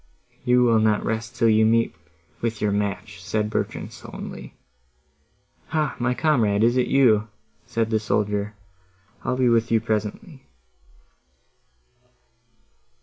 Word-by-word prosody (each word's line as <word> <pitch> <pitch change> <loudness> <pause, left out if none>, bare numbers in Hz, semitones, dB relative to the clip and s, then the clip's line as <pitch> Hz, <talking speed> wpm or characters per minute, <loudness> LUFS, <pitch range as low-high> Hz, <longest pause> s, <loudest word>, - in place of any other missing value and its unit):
"You 125 0 +4
will 115 -2 +4
not 110 -1 +2
rest 115 +1 -3
till 115 - +3
you 110 0 +4
meet 115 -2 +2 0.5
with 115 -2 -2
your 105 -1 +1
match," 100 -1 -3
said 105 +2 -1
Bertrand - - -3
sullenly. - - -9 1.1
"Hah! 155 -1 -1
my 125 +1 0
comrade, 110 -10 +2
is 120 +2 +3
it 125 -1 +2
you?" 115 -6 +4 0.4
said 115 -1 -1
the 110 - +2
soldier—"I'll 100 0 -4
be 130 -1 +3
with 115 -1 +3
you 115 - +4
directly." 110 - -4
110 Hz, 120 wpm, -23 LUFS, 105-120 Hz, 1.1 s, You